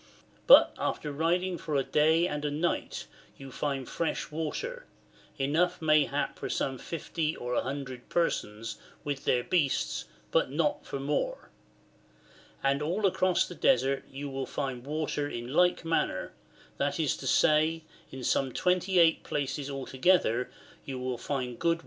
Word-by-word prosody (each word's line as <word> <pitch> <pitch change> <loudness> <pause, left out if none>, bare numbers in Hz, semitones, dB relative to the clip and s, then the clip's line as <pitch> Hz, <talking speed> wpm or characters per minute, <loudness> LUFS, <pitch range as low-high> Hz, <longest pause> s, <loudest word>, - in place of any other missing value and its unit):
But - - +9
after 150 - -2
riding 175 +4 0
for 155 - -3
a 135 - +3
day 160 +5 +3
and 150 -3 -3
a 150 - 0
night 155 +4 -2 0.3
you 135 -1 -10
find 135 -2 -2
fresh 165 -2 -2
water, 475 - -4 0.5
enough 155 +6 +1
mayhap 155 -3 +2
for - - -4
some 135 -1 -1
50 160 -1 -3
or 125 0 -4
100 130 -1 -3
persons 110 -10 -1 0.3
wtch 140 -2 -3
their 125 -1 +2
beasts, 150 -5 0 0.3
but - - +2
not 150 +2 0
for 140 - -4
more. 150 - -2 1.1
And 140 +1 +2
all 180 +8 0
across 185 -1 +2
the - - -8
Desert 135 -3 +2
you 140 +2 -6
will 135 -1 -4
find 135 -4 -3
water 150 -1 -2
in 120 +1 -5
like 180 +1 +3
manner, 165 0 0 0.5
that - - -1
is - - +1
to - - -6
say, 155 +1 +3 0.3
in 130 -1 -7
some 135 +1 +1
28 180 0 +3
places 140 0 -3
altogether 135 -2 +1 0.3
you 135 -2 -5
will 125 -1 -3
find 125 -4 -3
good 170 - +2
water, 165 - +4
Chap. - - -13
145 Hz, 150 wpm, -29 LUFS, 135-165 Hz, 1.1 s, But